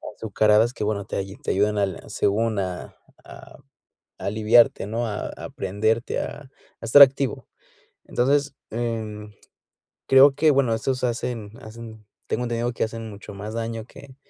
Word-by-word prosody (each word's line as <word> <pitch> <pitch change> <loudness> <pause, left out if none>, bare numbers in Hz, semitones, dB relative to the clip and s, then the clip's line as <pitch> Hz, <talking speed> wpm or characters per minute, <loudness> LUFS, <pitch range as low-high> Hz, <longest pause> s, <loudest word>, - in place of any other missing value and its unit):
azucaradas 110 +2 +2
que, - - -5
bueno, 105 -1 -2
te 100 - -3 0.2
te - - -1
ayudan 105 +2 +1
al, 100 -2 -1
según, 110 +1 0
a 90 -2 -5 0.3
a - - -13 0.6
aliviarte, 110 +2 +3
¿no?, 115 +3 -2
a 105 -2 -4
a, - - -9
prenderte, 110 +4 -1
a 145 - -6
a 130 -4 -18
estar 140 +5 +9
activo, 135 -1 +3 0.6
entonces, 140 +3 +1 0.2
eh, 115 -1 -2 1.1
creo 135 +2 +8
que, 155 0 +4
bueno, 135 -4 +2
estos 125 +3 -2
hacen 120 -3 -3
hacen, 110 -1 -11 0.2
tengo 125 - -1
entendido, 120 0 -1
que - - -1
hacen 115 0 -7
mucho 105 0 -10
más 105 +2 -7
daño 115 -1 -4
que 135 +1 -14
115 Hz, 145 wpm, -24 LUFS, 105-125 Hz, 1.1 s, estar